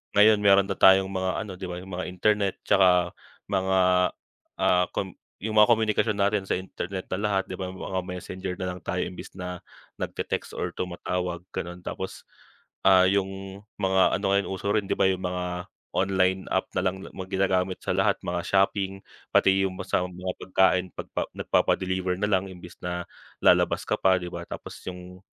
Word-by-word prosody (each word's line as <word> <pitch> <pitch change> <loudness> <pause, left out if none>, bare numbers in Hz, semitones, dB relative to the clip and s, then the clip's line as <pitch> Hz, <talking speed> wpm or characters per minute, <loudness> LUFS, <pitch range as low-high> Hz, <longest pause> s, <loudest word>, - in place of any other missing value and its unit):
ngayon, 105 0 +7
meron 100 -1 +6
na 100 - -4
tayong 95 0 +6
mga 95 -1 -1
ano 105 - -8
‘di 95 - -5
ba, 90 - -5
yung 95 - -11
mga 90 - -3
internet 100 +2 +1
tsaka 90 -3 +4 0.4
mga, 95 0 +2 0.9
ah, 90 0 +4
kom 95 -1 -2 0.3
yung 110 0 -2
mga 105 - +7
komunikasyon 110 -1 +1
natin 100 -1 +1
sa - - +1
internet 95 0 -5
na 95 - 0
lahat, 100 -2 +1
‘di - - -6
ba? 95 - -3
Mga 95 0 -4
Messenger 90 0 -5
nalang 90 0 -3
tayo 90 0 -1
imbis 90 - -8
na 90 -1 -5 0.4
nagte-text - - -3
or - - -2
tumatawag 90 -1 -3
gano’n 85 +1 -6
tapos, 95 - -6 0.6
ah, 95 -1 +7
yung 95 0 -2 0.2
mga 95 -1 +3
ano 100 - -4
ngayon, 100 0 +2
uso 95 +1 -3
rin 105 -2 +1
‘di - - +1
ba, - - +3
yung 95 0 -1
mga 90 0 -3 0.3
online 95 0 +1
app - - 0
na - - +3
lang 95 +1 -1 0.3
ginagamit 95 -1 0
sa - - -1
lahat, - - +4
mga 85 0 -2
shopping, 95 0 +1 0.3
pati 95 0 +4
yung 95 - -2
mga 90 -1 -2
pagkain 95 -1 +2
pagpa - - -4
nagpapa-deliver 95 0 +1
nalang 100 -2 +1
imbes 90 -1 -11
na 90 0 -3 0.4
lalabas - - +4
ka - - +1
pa, 95 -1 +4
‘di 90 - -5
ba. - - -5
Tapos - - -8
yung, 90 0 -8
95 Hz, 170 wpm, -26 LUFS, 90-95 Hz, 0.9 s, ngayon